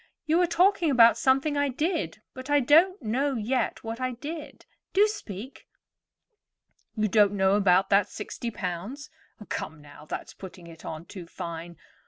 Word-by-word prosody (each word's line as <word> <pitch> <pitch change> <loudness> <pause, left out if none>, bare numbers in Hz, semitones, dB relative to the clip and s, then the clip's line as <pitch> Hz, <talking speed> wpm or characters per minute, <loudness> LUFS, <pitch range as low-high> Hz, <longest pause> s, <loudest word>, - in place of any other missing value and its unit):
"You 325 +3 +3
are 355 - +3
talking 350 0 +3
about 235 -4 +6
something 270 +3 +2
I 285 0 +1
did; 260 - -2
but 260 +1 -9
I 290 0 +4
don't 325 +9 +4
know 265 +5 0
yet 235 +2 -1
what 225 +2 -5
I 255 0 -1
did. 295 +3 -8 0.3
Do 405 +2 +5
speak." 235 - -8 1.3
"You 215 -1 +1
don't 205 0 +4
know 190 -1 +2
about 195 -2 +3
that 200 0 +4
sixty 235 - -6
pounds. 205 - -6 0.4
Come, 160 - -5
now, 145 0 -14
that's - - -6
putting 185 -2 -11
it 165 -1 -13
on 160 +1 -7
too 180 -2 -10
fine. 170 0 -7
235 Hz, 160 wpm, -27 LUFS, 190-290 Hz, 1.3 s, about